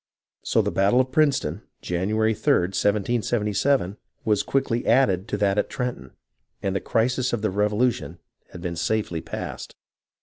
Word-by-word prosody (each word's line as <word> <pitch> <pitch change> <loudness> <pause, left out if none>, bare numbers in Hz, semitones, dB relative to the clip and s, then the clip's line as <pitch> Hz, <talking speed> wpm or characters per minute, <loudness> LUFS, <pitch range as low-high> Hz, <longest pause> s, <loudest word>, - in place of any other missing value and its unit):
So - - +1
the - - -1
battle 100 +6 +3
of 130 0 +1
Princeton, 145 -1 +1 0.2
January 110 +5 +1
3d, 90 -3 +1
1777, 105 +1 +1 0.3
was 105 -2 +2
quickly 125 -3 0
added 105 -6 +3
to 105 - -2
that 100 0 +2
at - - -1
Trenton, 125 -2 -4 0.5
and 95 -1 -1
the 95 - 0
crisis 125 +2 0
of 115 -3 -2
the 110 - +1
Revolution 105 - 0 0.3
had 85 - -10
been 85 -1 -3
safely 85 -1 -1
passed. - - -7
105 Hz, 145 wpm, -24 LUFS, 95-120 Hz, 0.5 s, battle